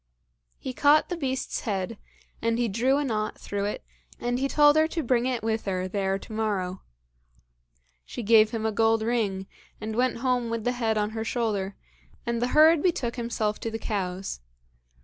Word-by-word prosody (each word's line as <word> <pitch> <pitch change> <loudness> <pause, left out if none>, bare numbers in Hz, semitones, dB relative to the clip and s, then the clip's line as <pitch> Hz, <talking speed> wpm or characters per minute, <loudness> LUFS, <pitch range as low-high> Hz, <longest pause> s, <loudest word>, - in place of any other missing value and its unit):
He 260 - -6
caught 295 +4 +4
the 355 - -1
beast's 265 -5 -2
head, 205 0 -3 0.4
and 230 0 +1
he 240 0 +1
drew 245 +7 +2
a 295 - 0
knot 215 -5 -2
through 200 0 -3
it, 205 - -3 0.4
and 245 +1 -1
he 275 - +1
told 295 +1 +5
her 315 0 +4
to 325 0 -3
bring 245 0 +2
it 245 -4 -2
with 220 0 -1
her 185 -2 -1
there 195 0 -1
to 205 - -11
morrow. 195 -4 -2 1.2
She 240 - -7
gave 215 0 +6
him 220 -1 -3
a 220 - +1
gold 225 +1 +2
ring, 215 -5 0 0.3
and 220 0 -4
went 250 0 +1
home 245 -1 0
with 230 -1 -2
the 245 - +1
head 225 -3 0
on 210 0 0
her 220 0 -3
shoulder, 215 -4 -1 0.5
and 235 -1 -1
the 245 - +2
herd 315 0 +7
betook 270 -10 0
himself 230 -3 -2
to 230 - -3
the 225 - -4
cows. 190 - -3
225 Hz, 190 wpm, -26 LUFS, 210-250 Hz, 1.2 s, herd